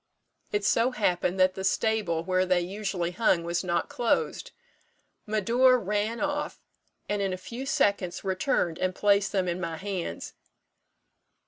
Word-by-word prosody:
It 205 -1 -1
so 230 +5 +3
happened 185 -5 0
that 185 0 +4
the 190 - -6
stable 195 -5 +1
where 185 +1 +1
they 185 -1 +2
usually 185 -1 -3
hung 180 -2 +2
was 170 +1 -1
not 175 -2 0
closed. 245 - -1 0.8
Médor 240 +5 +4
ran 210 +3 -1
off, 295 0 -2 0.5
and 205 0 -1
in 195 -1 0
a - - -3
few 240 +8 -7
seconds 200 - +1
returned 190 - 0
and 185 0 -1
placed 200 -1 +3
them 190 -3 0
in 175 +1 -2
my 165 -2 -3
hands. 190 -1 -5
195 Hz, 145 wpm, -27 LUFS, 180-220 Hz, 0.8 s, that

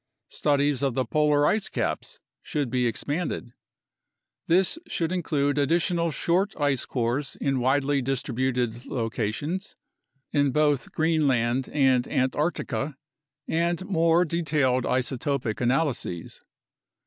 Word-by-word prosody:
Studies 145 -2 +1
of 135 -4 0
the 130 - +1
polar 150 -1 +3
ice 210 +4 +1
caps - - -3 0.2
should 145 -6 -2
be 125 -1 +2
expanded. 140 0 -3 0.9
This 185 - +3
should 165 0 -1
include 145 -5 0
additional 170 +3 +1
short 175 +7 0
ice 145 -3 +1
cores 130 +3 -2
in 135 -2 0
widely 135 +2 +2
distributed 125 -2 -1
locations, 125 - -3 0.6
in 145 -1 +3
both 145 -3 +1
Greenland 135 -6 +1
and 130 -4 +3
Antarctica, 145 +1 -1 0.5
and 170 +2 0
more 170 -2 +3
detailed 150 -6 +1
isotopic 130 -2 -1
analyses. 125 - -1
140 Hz, 105 wpm, -26 LUFS, 125-160 Hz, 0.9 s, polar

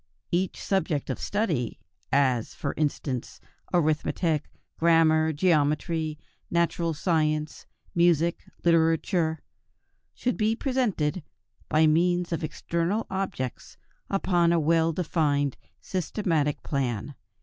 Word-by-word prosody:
Each 180 +2 0
subject 165 -8 -1
of - - -4
study, 205 - -1 0.3
as, 130 -5 +2
for 140 - -3
instance, 140 -4 -2 0.3
arithmetic, 155 -1 +1 0.3
grammar, 160 -1 +4
geometry, 155 0 +1 0.3
natural 170 -1 0
science, 155 -1 0 0.3
music, 170 -1 +2 0.2
literature, 165 -1 +2 0.7
should 250 - -1
be 220 0 +2
presented 215 - 0 0.5
by 155 +1 +4
means 175 +3 +2
of 165 - -2
external 170 +6 -1
objects 190 -10 -4 0.3
upon 175 -3 +2
a 170 - +3
well 165 +1 +3
defined 150 -5 0 0.3
systematic 165 -5 -1
plan. 130 -2 -2
165 Hz, 95 wpm, -27 LUFS, 150-175 Hz, 0.7 s, grammar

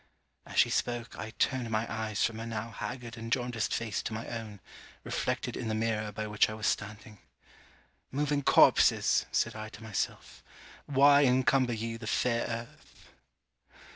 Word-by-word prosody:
As - - -8
she - - +5
spoke, 120 -1 -2
I 110 - -6
turned 130 -3 0
my 110 0 0
eyes 110 -1 -1
from 110 -1 -3
her 115 - -5
now 115 0 -4
haggard 120 -1 -6
and 115 0 -7
jaundiced 120 -2 -1
face 110 -3 -1
to 110 - -5
my 110 - -5
own, 110 -3 -6 0.4
reflected - - -2
in - - -4
the 110 - -1
mirror 110 -1 -1
by 110 +1 -4
which 105 0 +2
I 110 - -5
was 110 -1 -5
standing. 105 0 -3 0.9
'Moving 145 +1 0
corpses!' - - +5
said - - 0
I 110 0 -6
to 110 - -12
myself 110 -3 -4 0.5
'Why 140 +1 +6
encumber 130 0 +3
ye 115 +1 -4
the 110 -1 -8
fair 115 +1 +1
earth?' 115 0 -8
115 Hz, 165 wpm, -30 LUFS, 110-120 Hz, 0.9 s, Why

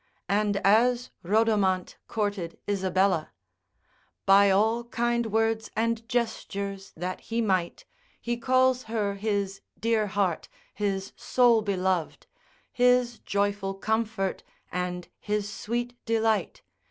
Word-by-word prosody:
And 205 0 +2
as 240 +4 +3
Rhodomant 200 -2 +1
courted 205 -6 -2
Isabella: 190 -4 +1 0.9
By 200 +1 +6
all 220 +5 +2
kind 235 0 0
words 225 0 0
and 230 +1 -1
gestures 200 -5 -3
that 180 +2 -4
he 230 +1 -3
might, 185 -6 0 0.3
He 240 0 -2
calls 255 +1 +2
her 215 -3 -1
his 200 -1 -2 0.2
dear 225 -2 +1
heart, 195 -4 -1 0.2
his 195 -1 -2
sole 240 -3 +3
beloved, 185 -4 -1 0.5
His 250 -1 +3
joyful 200 -1 -1
comfort, 215 -1 -1 0.3
and 180 -1 -3
his 210 -1 -2
sweet 240 +3 -3
delight. 225 -1 0
210 Hz, 105 wpm, -27 LUFS, 195-230 Hz, 0.9 s, By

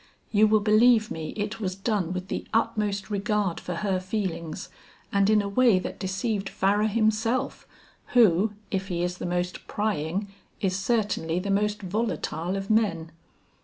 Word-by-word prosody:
You 215 0 +5
will 215 0 +4
believe 220 +1 +4
me 160 -1 -4
it 210 +1 -3
was 185 -4 -2
done 195 -3 -1
with 185 0 -4
the - - -4
utmost 210 -2 0
regard 205 -2 0
for 180 - -5
her 190 -2 +1
feelings 185 -3 -4 0.5
and 200 0 +3
in 215 -1 +4
a - - -3
way 230 0 +4
that 185 - -4
deceived 195 +1 -2
Farrar 205 +3 +2
himself, 225 +4 0 0.5
who 210 -2 +5 0.2
if 190 0 -1
he 175 -2 -2
is 180 0 -3
the - - -3
most 180 0 -3
prying 200 -2 -1 0.3
is 185 -2 0
certainly 195 -5 0
the 195 +2 -1
most 210 +1 0
volatile 190 -3 -2
of 195 0 -4
men. 170 -7 +1
200 Hz, 160 wpm, -26 LUFS, 185-215 Hz, 0.5 s, You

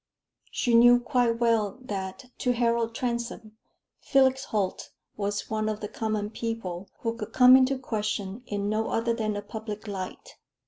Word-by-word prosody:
She 240 - 0
knew 240 +1 +7
quite 245 -1 +1
well 230 -3 +1
that, 200 0 -5
to 250 -2 +1
Harold 230 -1 +1
Transome, 235 -3 -3 0.4
Felix 265 0 +3
Holt 200 -4 -2 0.3
was 205 0 -2
one 215 0 -1
of 215 -1 -3
the 210 - -4
common 215 -1 -2
people 205 -6 -4
who 230 -1 -1
could 220 -1 -7
come 250 0 +8
into 265 +1 +4
question 215 -3 -3
in 205 -1 -2
no 215 +1 0
other 230 +1 0
than 215 -2 -2
a 205 - -4
public 215 0 -7
light. 195 - -6
225 Hz, 155 wpm, -27 LUFS, 210-240 Hz, 0.4 s, come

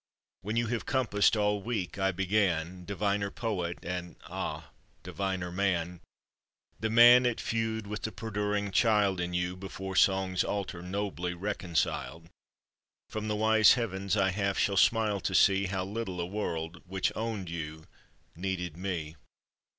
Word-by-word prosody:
When 105 +3 -3
you 115 0 +2
have 115 0 -3
compassed 115 -4 +2
all 105 -1 +1
weak 105 -4 -3
I 95 0 +2
began, 90 -2 0
Diviner 100 +1 -1
poet, 95 -7 -3
and 90 -1 -4
ah! 80 -4 -5 0.3
diviner 95 -2 -3
man 90 -2 -1 0.8
The 110 - -1
man 120 +2 +8
at 120 - -1
feud 110 -1 -2
with 105 +1 -5
the 110 - -3
perduring 105 -2 -2
child 105 -5 +3
In 90 0 -3
you 90 +1 -1
before 95 0 -6
song's 95 -1 +3
altar 95 -4 -3
nobly 90 -1 -3
reconciled 85 -3 -2 0.8
From 110 0 -4
the 105 - 0
wise 110 0 +6
heavens 100 -4 -1
I 95 -1 +3
half 100 0 -1
shall 100 - +2
smile 105 +1 +3
to 95 - -2
see 100 0 +4
How 95 -1 -2
little 100 -3 -4
a 85 - -1
world, 85 -4 -4
which 95 0 -1
owned 110 -4 -3
you, 80 -1 -6 0.5
needed 90 -2 -3
me. 85 -4 -4
95 Hz, 145 wpm, -30 LUFS, 90-105 Hz, 0.8 s, man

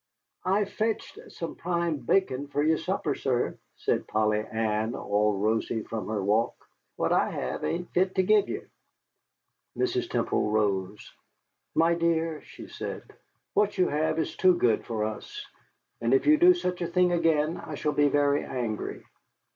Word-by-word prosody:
"I've 200 +2 +1
fetched 220 0 -2
some 165 - -5
prime 170 -2 -1
bacon 140 0 +1
fer 145 +1 -1
your 160 +1 +3
supper, 165 -4 -1
sir," 125 -3 -1 0.2
said - - -1
Polly 105 0 +1
Ann, 110 +1 -1
all 105 0 +1
rosy 110 +2 0
from 110 -1 -5
her 105 -2 -2
walk; 110 +4 +1 0.4
"what - - +1
I - - +3
have - - -4
ain't 175 +1 -2
fit 185 +1 +1
to 190 - +3
give 210 +2 +3
ye." - - -3 1.2
Mrs. 370 -1 0
Temple - - 0
rose. 100 -2 -1 0.6
"My 165 +1 +4
dear," 165 -2 0
she - - -12
said, - - -6 0.5
"what 205 0 +2
you 185 - +3
have 155 +2 0
is 160 - -2
too 185 -1 +5
good 120 -8 +2
for 110 -3 -1
us. 415 - -5 0.6
And - - +3
if 395 - +2
you 300 - +7
do 360 +1 +7
such 180 - -3
a 170 - 0
thing 180 +1 +2
again, 165 -2 +2
I 155 - -6
shall 150 +1 -1
be 145 0 +4
very 145 0 +2
angry." 120 -5 -4
155 Hz, 165 wpm, -27 LUFS, 110-180 Hz, 1.2 s, you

